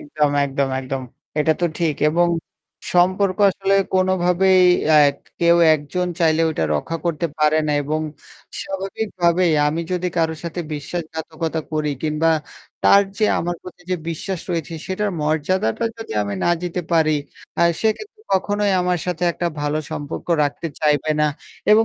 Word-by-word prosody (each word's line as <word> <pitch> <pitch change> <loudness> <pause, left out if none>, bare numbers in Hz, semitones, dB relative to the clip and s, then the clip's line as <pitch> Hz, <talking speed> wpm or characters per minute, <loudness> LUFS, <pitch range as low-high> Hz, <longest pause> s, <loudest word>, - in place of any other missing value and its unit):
একদম, 150 - 0
একদম, 140 0 -1
একদম। 130 0 -4 0.4
এটা 160 +1 +3
তো 175 - +3
ঠিক 160 -4 +1 0.2
এবং 175 +2 +3 0.7
সম্পর্ক 185 +2 +3
আসলে 195 +1 0 0.2
কোনোভাবেই 185 0 +3 0.3
আ - - +7
এক 140 - -13 0.2
কেউ 170 0 +5 0.2
একজন 165 +5 -2
চাইলে 160 -1 +3
ওটা 155 - -1
রক্ষা 165 - -2
করতে 170 0 0
পারে 155 +1 +3
না 150 - +1
এবং 155 +2 -1 0.6
স্বাভাবিকভাবেই 185 -3 0 0.2
আমি 160 +3 -2
যদি 180 0 0
কারো 160 -1 +1
সাথে 170 +1 -4
বিশ্বাসঘাতকতা 160 +1 -4
করি 155 -1 0
কিংবা 155 +1 +1 0.5
তার 200 0 +7 0.2
যে 215 - +3
আমার 175 +1 -2
প্রতি 180 -1 -12
যে 180 - +1
বিশ্বাস 175 +2 -4
রয়েছে 165 -1 -3
সেটার 200 +2 -1
মর্যাদাটা 155 - 0
যদি 225 - -7
আমি 100 0 -3
না - - +3
দিতে 180 0 -2
পারি, 160 -2 +4 0.5
আ - - +5 0.2
সে 220 - +3
কিন্তু 430 +1 -12
কখনোই 205 +1 +1
আমার 180 -1 +1
সাথে 180 -1 -3
একটা 175 - -2
ভালো 150 +1 0
সম্পর্ক 145 -1 -5 0.2
রাখতে 145 +3 -3
চাইবে 150 0 +2
না 150 - +4 0.5
এবং 225 +1 +6
170 Hz, 155 wpm, -21 LUFS, 155-185 Hz, 0.7 s, আ